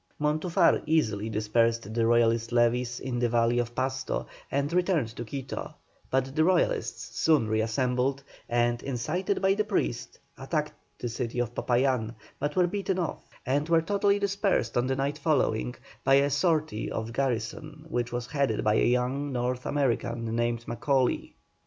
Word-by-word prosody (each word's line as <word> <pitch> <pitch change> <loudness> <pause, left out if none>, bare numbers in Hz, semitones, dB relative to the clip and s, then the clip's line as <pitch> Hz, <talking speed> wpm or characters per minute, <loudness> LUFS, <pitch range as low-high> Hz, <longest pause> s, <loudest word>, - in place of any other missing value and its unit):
Montufar 155 +3 +2
easily 110 -10 +1
dispersed 110 0 +1
the 115 0 +2
Royalist 115 0 +3
levies 120 +1 +2
in 125 -2 -3
the 120 -1 +2
valley 120 +1 +2
of 120 0 -3
Pasto, 130 +1 -2 0.2
and 140 +3 -1
returned 175 - +2
to 120 - -5
Quito, 130 +3 -6 0.3
but 130 +1 0
the 155 - +4
Royalists 180 +1 0
soon 150 -8 +3
re 110 0 +1
assembled, 125 +3 0 0.3
and, 120 0 +1
incited 155 +10 -2
by 190 0 +5
the 210 +2 +1
priests, 190 - -2 0.2
attacked 150 +3 -2 0.2
the 120 - -4
city 120 0 -4
of 120 -1 -1
Popayán, 120 -2 +1 0.2
but 145 +1 -2
were 180 - +4
beaten 190 +1 -2
off, 175 -4 -4 0.2
and 145 +4 0
were 165 -1 +4
totally 200 +2 +2
dispersed 200 0 0
on 120 +1 +2
the 135 - 0
night 140 +2 -2
following 125 -6 +1 0.3
by 135 0 +5
a 140 +1 +3
sortie 155 -5 +1
of 110 - -2
the 115 - -8
garrison, 135 +5 -3
which 120 -6 -2
was 120 0 -3
headed 140 -6 0
by 105 - +3
a - - +3
young 125 +4 0
North 125 0 -2
American 115 -4 -1
named 120 0 -1
Macaulay. 130 +2 0
130 Hz, 165 wpm, -28 LUFS, 120-150 Hz, 0.3 s, by